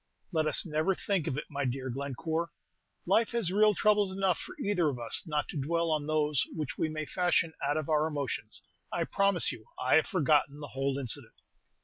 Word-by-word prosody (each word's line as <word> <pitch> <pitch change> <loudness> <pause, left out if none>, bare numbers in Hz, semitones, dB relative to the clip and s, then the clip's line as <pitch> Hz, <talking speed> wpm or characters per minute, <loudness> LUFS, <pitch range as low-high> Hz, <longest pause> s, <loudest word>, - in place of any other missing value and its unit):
"Let 160 -3 +1
us 155 - +4
never 160 +4 +1
think 190 -5 -1
of 130 - -1
it, 150 - -2
my 140 -1 -3
dear 130 0 -2
Glenoore. 150 +6 -3 0.6
Life 230 +1 +2
has 225 -7 0
real 210 +1 +4
troubles 210 -2 +3
enough 190 -4 +1
for - - -8
either 180 -6 +1
of 135 - -4
us, 115 -1 +2
not 150 -2 -1
to 145 - -3
dwell 165 +3 0
on 150 -1 0
those 150 -3 +2
which 155 -4 -3
we 160 - -1
may 155 0 -4
fashion 175 -1 +1
out 145 +2 +1
of 155 - -2
our 155 -1 +2
emotions. 140 -7 -4 0.3
I - - 0
promise 195 -3 +2
you, 110 -2 -11
I 130 - +4
have 160 - +2
forgotten 150 - +2
the 145 -2 -7
whole 135 0 -1
incident." 130 -5 -4
155 Hz, 205 wpm, -30 LUFS, 140-175 Hz, 0.6 s, us